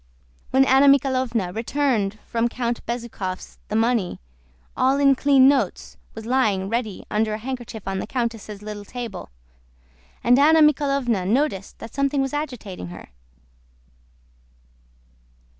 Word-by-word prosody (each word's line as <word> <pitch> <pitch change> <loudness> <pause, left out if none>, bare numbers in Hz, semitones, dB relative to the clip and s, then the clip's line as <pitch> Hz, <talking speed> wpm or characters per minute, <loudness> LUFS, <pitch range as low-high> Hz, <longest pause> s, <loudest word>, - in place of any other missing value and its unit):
When 265 +1 +4
Anna 270 +2 +5
Mikháylovna 255 -8 +2
returned 225 -4 0
from 235 +1 0
Count 240 -1 -3
Bezúkhov's 230 -6 -5
the 210 - -4
money, 225 -4 +1 0.6
all 265 +2 +2
in 275 -1 +5
clean 270 -1 +5
notes, 275 -1 0 0.2
was 220 0 -8
lying 215 -7 +1
ready 225 -3 -3
under 215 0 +1
a - - -4
handkerchief 240 -3 -7
on 195 0 -2
the - - -5
countess' 225 -4 -4
little 210 -1 -7
table, 235 - -7 0.9
and 245 +2 +5
Anna 315 +3 +6
Mikháylovna 275 -9 +2
noticed 225 -4 -1
that 225 - -10
something 275 0 0
was 270 0 -1
agitating 245 - -5
her. 85 - -11
240 Hz, 125 wpm, -23 LUFS, 215-270 Hz, 0.9 s, Anna